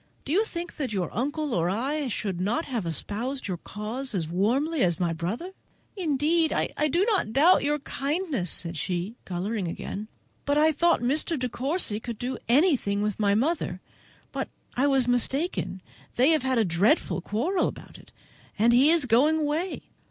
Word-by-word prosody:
Do 275 Hz, -, -4 dB
you 395 Hz, +7 st, +4 dB
think 345 Hz, -4 st, -6 dB
that 270 Hz, -6 st, -2 dB
your 190 Hz, -4 st, -2 dB
uncle 290 Hz, +4 st, -1 dB
or 170 Hz, -2 st, +1 dB
I 270 Hz, +9 st, -1 dB
should 195 Hz, -6 st, -3 dB
not 230 Hz, -, 0 dB
have 230 Hz, -9 st, -3 dB
espoused 230 Hz, -, -3 dB
your 185 Hz, -3 st, -2 dB
cause 220 Hz, +7 st, -5 dB
as 165 Hz, -4 st, -1 dB
warmly 250 Hz, -, +1 dB
as 175 Hz, -3 st, +1 dB
my 170 Hz, -2 st, +1 dB
brother?" 205 Hz, -, -4 dB, 0.4 s
"Indeed, 320 Hz, -2 st, +1 dB
I -, -, 0 dB, 0.2 s
did 350 Hz, -, +1 dB
not 345 Hz, -, 0 dB
doubt 320 Hz, +8 st, +5 dB
your 295 Hz, +1 st, +1 dB
kindness," 280 Hz, -, -2 dB
said 165 Hz, 0 st, -3 dB
she, 180 Hz, +5 st, -2 dB
colouring 190 Hz, +2 st, -2 dB
again, 200 Hz, +5 st, -5 dB, 0.4 s
"but 285 Hz, +1 st, +1 dB
I 310 Hz, +1 st, +5 dB
thought 340 Hz, +1 st, +2 dB
Mr. 300 Hz, +6 st, +2 dB
De 255 Hz, -1 st, -1 dB
Courcy 260 Hz, -, -1 dB
could 235 Hz, -1 st, -6 dB
do 250 Hz, +2 st, -4 dB
anything 245 Hz, -, +3 dB
with 210 Hz, -1 st, -2 dB
my 200 Hz, -1 st, +3 dB
mother; 250 Hz, -, 0 dB, 0.5 s
but -, -, -3 dB, 0.3 s
I 270 Hz, +3 st, +2 dB
was 270 Hz, -3 st, +2 dB
mistaken: 245 Hz, -, 0 dB, 0.3 s
they 255 Hz, +4 st, +4 dB
have 315 Hz, -3 st, +3 dB
had 260 Hz, -1 st, 0 dB
a 225 Hz, -, +3 dB
dreadful 185 Hz, -, +2 dB
quarrel 295 Hz, -, 0 dB
about -, -, -9 dB
it, -, -, -18 dB, 0.5 s
and 230 Hz, +3 st, +4 dB
he 265 Hz, +5 st, +6 dB
is 330 Hz, -4 st, +4 dB
going 290 Hz, +7 st, +3 dB
away. 310 Hz, +5 st, -2 dB
255 Hz, 175 wpm, -26 LUFS, 205-305 Hz, 0.5 s, he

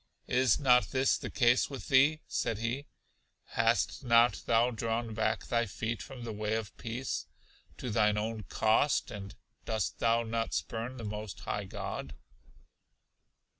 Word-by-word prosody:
Is 125 Hz, -2 st, +3 dB
not 125 Hz, -3 st, +5 dB
this 130 Hz, 0 st, +2 dB
the -, -, -5 dB
case 120 Hz, -1 st, +3 dB
with 135 Hz, -2 st, -7 dB
thee? 145 Hz, +4 st, +5 dB
said 115 Hz, -, -1 dB
he: 120 Hz, +6 st, -3 dB, 0.6 s
Hast -, -, +1 dB
not 115 Hz, -2 st, +4 dB
thou 115 Hz, +2 st, +4 dB
drawn 115 Hz, 0 st, -2 dB
back 110 Hz, 0 st, 0 dB
thy 120 Hz, -1 st, +1 dB
feet 110 Hz, +3 st, -3 dB
from 135 Hz, -3 st, -9 dB
the 115 Hz, -2 st, -4 dB
way 105 Hz, +1 st, -1 dB
of 110 Hz, -1 st, -4 dB
peace, 120 Hz, +3 st, -4 dB, 0.5 s
to 125 Hz, -, -4 dB
thine 105 Hz, -1 st, +3 dB
own 110 Hz, +1 st, -2 dB
cost; 110 Hz, +6 st, +2 dB
and 100 Hz, 0 st, -7 dB, 0.3 s
dost 110 Hz, -4 st, -2 dB
thou 115 Hz, 0 st, +3 dB
not 115 Hz, 0 st, -2 dB
spurn 120 Hz, +3 st, -3 dB
the 115 Hz, -, -7 dB
most 105 Hz, -1 st, -6 dB
high -, -, -3 dB
God? 70 Hz, 0 st, -6 dB
115 Hz, 150 wpm, -31 LUFS, 110-125 Hz, 0.6 s, not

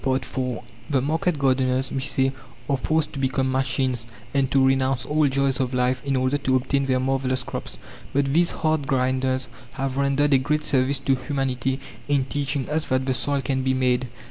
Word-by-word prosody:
IV 130 Hz, 0 st, -1 dB, 0.6 s
The 140 Hz, -3 st, +2 dB
market 160 Hz, +4 st, 0 dB
gardeners, 130 Hz, -1 st, +1 dB
we 135 Hz, -, -1 dB
say, 135 Hz, -1 st, +1 dB, 0.4 s
are 140 Hz, -, +2 dB
forced 155 Hz, +3 st, 0 dB
to 140 Hz, -, -5 dB
become 130 Hz, 0 st, 0 dB
machines 130 Hz, -2 st, 0 dB, 0.3 s
and 135 Hz, -2 st, +2 dB
to 135 Hz, -1 st, +4 dB
renounce 130 Hz, -2 st, +1 dB
all 150 Hz, 0 st, +2 dB
joys 135 Hz, -1 st, +1 dB
of 130 Hz, -1 st, -1 dB
life 125 Hz, 0 st, +1 dB
in 140 Hz, -1 st, 0 dB
order 130 Hz, +2 st, +1 dB
to 130 Hz, -1 st, +1 dB
obtain 135 Hz, +2 st, +1 dB
their 130 Hz, -1 st, +2 dB
marvellous 130 Hz, 0 st, 0 dB
crops. 90 Hz, -, -6 dB, 0.3 s
But 140 Hz, 0 st, +1 dB
these 170 Hz, +2 st, +4 dB
hard 155 Hz, -3 st, 0 dB
grinders 130 Hz, 0 st, 0 dB, 0.3 s
have 135 Hz, 0 st, -3 dB
rendered 140 Hz, +1 st, +2 dB
a 135 Hz, -, +6 dB
great 150 Hz, +3 st, 0 dB
service 135 Hz, +1 st, +2 dB
to 135 Hz, 0 st, +1 dB
humanity 130 Hz, 0 st, -1 dB, 0.3 s
in 140 Hz, -2 st, +2 dB
teaching 140 Hz, -1 st, -2 dB
us 155 Hz, 0 st, -1 dB
that 130 Hz, 0 st, 0 dB
the 130 Hz, -, +1 dB
soil 140 Hz, +2 st, 0 dB
can 130 Hz, 0 st, 0 dB
be 130 Hz, 0 st, +1 dB
"made." 125 Hz, 0 st, +1 dB
135 Hz, 190 wpm, -24 LUFS, 130-140 Hz, 0.6 s, a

